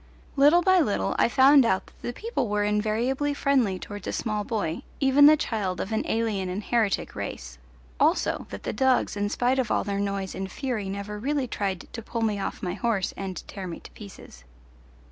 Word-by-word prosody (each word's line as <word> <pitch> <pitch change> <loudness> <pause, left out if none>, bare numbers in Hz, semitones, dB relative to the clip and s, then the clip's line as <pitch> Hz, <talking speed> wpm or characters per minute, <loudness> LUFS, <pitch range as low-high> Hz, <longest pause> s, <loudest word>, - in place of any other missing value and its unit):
Little 295 +5 +5
by 375 0 +5
little 235 -12 0
I - - +4
found 270 +2 +6
out 190 -5 +1
that - - -22
the - - -3
people 435 - -3
were 205 0 +1
invariably 225 +7 0
friendly 255 -10 +2
towards 205 +2 -8
a - - -1
small 215 -2 -2
boy, 205 -8 -2 0.2
even 280 +1 +6
the 305 +1 +7
child 205 -10 -2
of 200 - -4
an 220 - +1
alien 215 -5 -1
and 190 +4 -4
heretic 225 -4 0
race; - - -6 0.4
also - - +1
that 100 - -8
the - - -3
dogs 260 +1 +2
in 205 0 -1
spite 250 +4 +1
of 250 -4 0
all - - +1
their 200 0 -2
noise 200 -1 -2
and 190 0 -5
fury 240 -8 -3
never 200 +1 -5
really 275 +2 -1
tried 195 -5 -3
to 230 - -5
pull 230 +1 -4
me 210 -2 0
off 195 - -4
my 180 -1 -2
horse 205 0 -1
and 190 -2 -6
tear 190 -2 -7
me 170 - -6
to - - -14
pieces. 195 - -12
215 Hz, 200 wpm, -26 LUFS, 195-260 Hz, 0.4 s, the